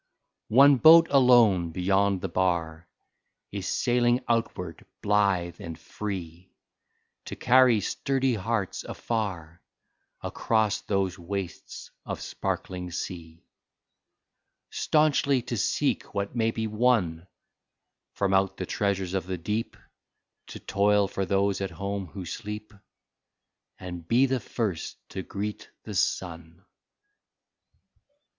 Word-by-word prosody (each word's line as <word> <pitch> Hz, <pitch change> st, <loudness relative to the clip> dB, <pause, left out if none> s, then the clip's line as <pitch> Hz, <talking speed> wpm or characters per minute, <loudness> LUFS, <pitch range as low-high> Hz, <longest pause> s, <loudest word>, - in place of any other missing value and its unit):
29 115 Hz, -, -2 dB
One 140 Hz, -, +4 dB
boat 165 Hz, +3 st, +8 dB
alone 120 Hz, -10 st, +5 dB
beyond 95 Hz, +2 st, +1 dB
the -, -, -2 dB
bar 85 Hz, -2 st, -1 dB, 0.6 s
Is 100 Hz, -2 st, -4 dB
sailing 120 Hz, 0 st, +2 dB
outward 105 Hz, -8 st, -2 dB, 0.2 s
blithe 100 Hz, -5 st, +1 dB
and 80 Hz, -2 st, -7 dB
free, 90 Hz, -4 st, -7 dB, 0.7 s
To -, -, -6 dB
carry 125 Hz, -3 st, +4 dB
sturdy 135 Hz, +5 st, 0 dB
hearts 110 Hz, -2 st, -2 dB
afar 90 Hz, -7 st, -4 dB, 0.6 s
Across 110 Hz, -2 st, 0 dB
those 95 Hz, -3 st, 0 dB
wastes 95 Hz, +1 st, -6 dB
of -, -, -5 dB
sparkling 90 Hz, -1 st, -4 dB
sea; 85 Hz, -1 st, -7 dB, 1.3 s
Staunchly 145 Hz, -4 st, +2 dB
to 125 Hz, 0 st, -4 dB
seek 100 Hz, -, -1 dB
what 100 Hz, +3 st, -2 dB
may 115 Hz, -1 st, +2 dB
be 110 Hz, 0 st, -3 dB
won 105 Hz, -7 st, +1 dB, 0.9 s
From 100 Hz, -1 st, 0 dB
out 95 Hz, 0 st, +2 dB
the 95 Hz, -, -3 dB
treasures 95 Hz, -1 st, -1 dB
of 95 Hz, -1 st, -2 dB
the 95 Hz, -1 st, -3 dB
deep, 105 Hz, +7 st, -3 dB, 0.7 s
To -, -, -9 dB
toil 100 Hz, 0 st, +2 dB
for 95 Hz, -1 st, -3 dB
those 100 Hz, 0 st, +1 dB
at 95 Hz, -, -2 dB
home 100 Hz, +2 st, -4 dB
who 95 Hz, +3 st, -8 dB
sleep 105 Hz, +2 st, -7 dB, 1.1 s
And 90 Hz, -2 st, -8 dB
be 125 Hz, +6 st, +4 dB
the 130 Hz, -1 st, 0 dB
first 105 Hz, -9 st, -3 dB
to 95 Hz, -, -5 dB
greet 105 Hz, +3 st, -5 dB
the -, -, -7 dB
sun. 85 Hz, 0 st, -2 dB
100 Hz, 115 wpm, -27 LUFS, 90-115 Hz, 1.3 s, boat